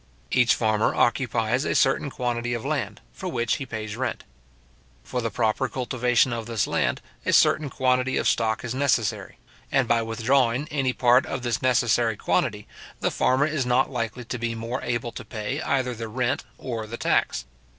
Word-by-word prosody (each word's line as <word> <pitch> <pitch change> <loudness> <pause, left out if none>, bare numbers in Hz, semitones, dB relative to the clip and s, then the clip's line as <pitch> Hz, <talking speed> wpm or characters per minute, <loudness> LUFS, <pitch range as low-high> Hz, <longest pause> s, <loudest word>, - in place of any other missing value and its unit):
Each 125 -2 +4
farmer 110 -1 +1
occupies 120 0 +1
a - - -1
certain 135 +1 +2
quantity 120 -2 -2
of 120 - -5
land, 125 -9 -2
for 190 - -6
which 120 -7 0
he 135 - -6
pays 110 -2 -5
rent. 130 +1 -3 0.8
For 125 - -3
the 115 - -1
proper 110 0 0
cultivation 125 -1 +1
of 115 -1 -4
this 115 -3 0
land, - - 0 0.2
a - - 0
certain 150 -1 +4
quantity 130 0 +1
of - - +1
stock 110 +1 +1
is 120 - -3
necessary; 130 -6 0 0.3
and - - +2
by 115 -1 +3
withdrawing 120 +4 +1
any 135 -3 +1
part 125 +1 +4
of 130 -3 -4
this 120 -2 -1
necessary 120 -3 +2
quantity, - - 0 0.3
the - - 0
farmer 130 +3 +2
is 155 -3 -1
not 125 +3 +2
likely 120 -1 -3
to 125 +1 -4
be 115 0 -2
more 115 +3 -4
able 120 0 -2
to - - -8
pay 125 +6 -4
either 130 -5 0
the 115 0 -6
rent 125 +3 -1
or 115 -4 -5
the 120 +2 -6
tax. - - +1
120 Hz, 180 wpm, -25 LUFS, 115-130 Hz, 0.8 s, Each